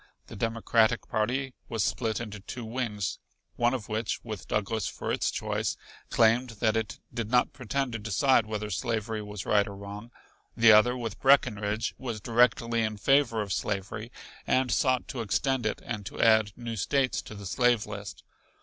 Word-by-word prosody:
The - - -11
Democratic 115 +1 +1
party 125 +5 -1 0.2
was 115 -4 0
split 110 0 -1
into 105 -3 -6
two 120 +4 -7
wings, 110 -4 -3 0.4
one 120 +2 +2
of 110 -6 -6
which, 110 +1 -2
with 110 -5 -7
Douglas 105 +1 -1
for - - -4
its - - +1
choice, - - -2 0.3
claimed 120 +2 +3
that 110 -2 +2
it 110 -2 -2 0.2
did 115 -3 -3
not 125 0 +3
pretend 130 0 -2
to 115 - -3
decide 110 +3 +2
whether 105 -1 -4
slavery 110 +3 -2
was 105 -2 -7
right 100 -1 +3
or 100 - -7
wrong; 100 +3 -8 0.5
the 115 0 +7
other 120 +4 +6
with 115 -4 -5
Breckenridge 110 -5 +2
was 120 -4 -4
directly 115 +1 +2
in 110 -1 -1
favor 115 -1 +3
of 100 -2 -3
slavery 105 +4 -3 0.4
and 130 -1 +2
sought 130 0 +2
to 130 -4 -4
extend 115 +5 0
it - - -3
and 105 -3 -4
to - - -8
add 110 -2 +5
new 120 -1 -5
States 130 +5 +1
to 110 - -10
the 100 -1 -9
slave 120 +3 +2
list. 100 -2 -8
115 Hz, 175 wpm, -28 LUFS, 105-120 Hz, 0.5 s, the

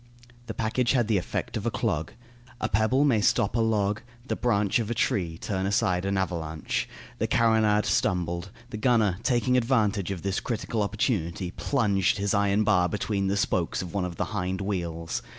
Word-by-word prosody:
The 110 - -5
package 115 +3 +1
had 120 -4 +2
the 110 -4 +2
effect - - -4
of - - -3
a - - +3
clog. 75 +1 -2 0.5
A - - 0
pebble 110 +6 +2
may 120 -7 +3
stop 100 +1 +2
a - - +2
log, 105 -2 +1 0.3
the - - -1
branch 105 -3 +1
of 115 -2 -2
a 120 - -1
tree 85 -7 0
turn 95 +1 -2
aside 95 -3 +1
an 100 0 0
avalanche. 80 -4 -2 0.3
The - - +1
carronade 110 -2 +3
stumbled. 85 0 0 0.2
The 110 - -4
gunner, 110 -5 +2
taking 125 +1 +2
advantage 110 -6 +1
of 95 -4 -4
this 95 -1 0
critical 115 -2 -2
opportunity, 100 - -1
plunged 100 -10 +1
his 100 +1 0
iron 100 +1 +2
bar 90 -4 +3
between 100 -1 -1
the 100 +1 0
spokes 90 -3 0
of 90 - -8
one 100 -3 0
of 90 -2 -5
the - - -1
hind 95 -2 -2
wheels. 85 -4 -3
100 Hz, 185 wpm, -27 LUFS, 90-110 Hz, 0.5 s, a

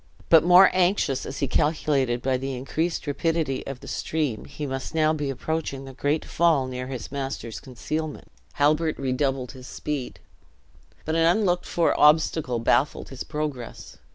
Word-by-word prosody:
But 165 -2 +7
more 180 +2 +7
anxious, 180 -7 +1
as 135 - -6
he 140 - +1
calculated 140 -4 +1
by 130 0 +1
the 135 +1 -4
increased 160 +7 -2
rapidity 155 -2 -1
of 135 -2 -6
the - - -11
stream 150 -8 -2
he 150 - -6
must 135 +2 -5
now 155 -1 +3
be 145 -3 -2
approaching 140 0 -3
the 135 - -9
great 145 +4 -1
fall 165 -5 +2
near 125 0 -5
his 130 -3 -6
master's 135 -5 -4
concealment, 150 +4 -5 0.2
Halbert 155 +2 +2
redoubled 130 -1 -1
his 130 -1 -11
speed. 145 -4 -5 0.9
But 155 - -1
an 165 0 +3
unlooked 180 -1 +2
for 170 - +2
obstacle 150 -4 +4
baffled 120 +5 +1
his 135 -2 -6
progress. 150 -6 -6
145 Hz, 155 wpm, -25 LUFS, 130-160 Hz, 0.9 s, But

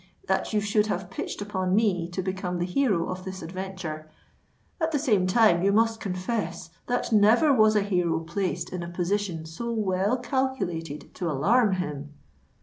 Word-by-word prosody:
—that - - 0
you 215 - +2
should 210 +1 +1
have 195 -2 -3
pitched 205 - -4
upon 190 -2 -1
me 190 -6 +1
to 180 +2 -3
become 185 -1 -3
the 175 - -1
hero 190 -4 +1
of 185 0 -5
this 190 -1 -7
adventure: 175 -3 -6 0.7
at 320 0 +1
the 300 - +1
same 215 -10 +2
time 185 -3 +4
you 200 +2 +3
must 225 +1 +2
confess 185 -3 -3 0.2
that 245 -1 -1
never 220 +8 +5
was 215 -3 +5
a 210 - +3
hero 180 -5 +1
placed 175 +1 -3
in 180 - -3
a 170 - -5
position 175 -1 -2
so 235 +9 -5
well 205 +1 +1
calculated 200 - -3
to 175 -3 -3
alarm 200 - +3
him." 150 -5 -4
190 Hz, 170 wpm, -26 LUFS, 175-215 Hz, 0.7 s, never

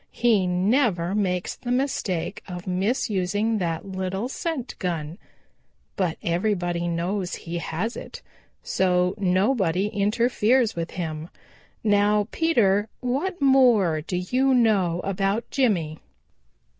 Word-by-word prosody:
He 220 -6 +2
never 185 -1 +1
makes 185 -3 -1
the 245 - -8
mistake 245 -9 -1
of 180 -1 -7
misusing 205 +2 0
that 165 0 -2
little 190 +3 -3
scent 275 -4 -4
gun. 170 -1 -3 0.8
But 180 -4 -1
everybody 175 -1 0
knows 175 +2 -2
he 170 0 -5
has 180 +8 -3
it, - - -9 0.4
so 180 0 +1
nobody 190 0 +1
interferes 230 +3 +2
with 170 0 -3
him. 160 -2 -4 0.5
Now, 205 -1 +3
Peter, 215 -11 +2
what 275 +9 -2
more 240 - +4
do 180 +3 -3
you 255 +9 +2
know 195 -8 +2
about 195 +3 -1
Jimmy?" 175 - 0
195 Hz, 110 wpm, -24 LUFS, 180-230 Hz, 0.8 s, more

